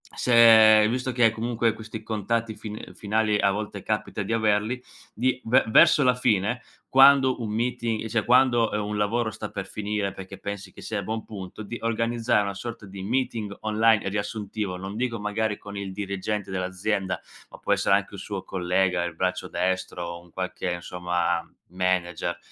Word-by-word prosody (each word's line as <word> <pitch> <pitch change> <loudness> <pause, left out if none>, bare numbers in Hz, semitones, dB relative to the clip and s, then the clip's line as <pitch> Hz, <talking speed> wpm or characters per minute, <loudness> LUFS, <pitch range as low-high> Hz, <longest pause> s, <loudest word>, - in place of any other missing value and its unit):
se 110 -3 +7
visto 130 +2 -1
che 115 -2 +4
comunque 115 0 0
questi 110 0 -8
contatti 110 +1 -2
fin 105 0 -8
finali 105 0 0
a 100 - +3
volte 105 0 -4
capita 105 0 -2
di 100 - -2
averli, 110 +2 +1 0.3
di 130 +1 0
ve 125 +4 +4
verso 140 +6 +6
la 125 -1 +5
fine, 120 -1 +1 0.3
quando 135 -1 +6
un 110 - -3
meeting 115 -1 -1
cioè, 110 -1 -1
quando 120 -2 +4 0.2
un 105 0 -3
lavoro 110 +2 0
sta 105 0 -6
per 100 -1 -5
finire, 105 -1 -3
perché 95 0 -9
pensi 100 -1 -6
che - - -12
sia 110 -2 -3
a - - -4
buon 110 +3 -3
punto, 100 0 -8
di 120 +3 -6
organizzare 115 -1 +1
una 100 0 -3
sorta 115 +2 -7
di 95 0 -9
meeting 110 -1 -2
online 110 0 +3
e 100 - -2
riassuntivo, 105 -1 -3
non 95 +2 -6
dico 120 -2 -2
magari 105 +1 -1
con 100 0 -9
il 100 -1 -5
dirigente 100 0 -3
dell'azienda, 95 +1 -2 0.3
ma - - -12
può - - -3
essere - - +3
anche - - -1
un - - -7
suo - - -5
collega, 90 0 0
il 85 -1 -5
braccio 90 +1 -1
destro 95 -1 -2
o 85 0 -6
un 85 - -20
qualche, 95 0 -4
insomma, 90 0 -1 0.3
manager, 90 -1 -1
105 Hz, 175 wpm, -25 LUFS, 95-115 Hz, 0.3 s, se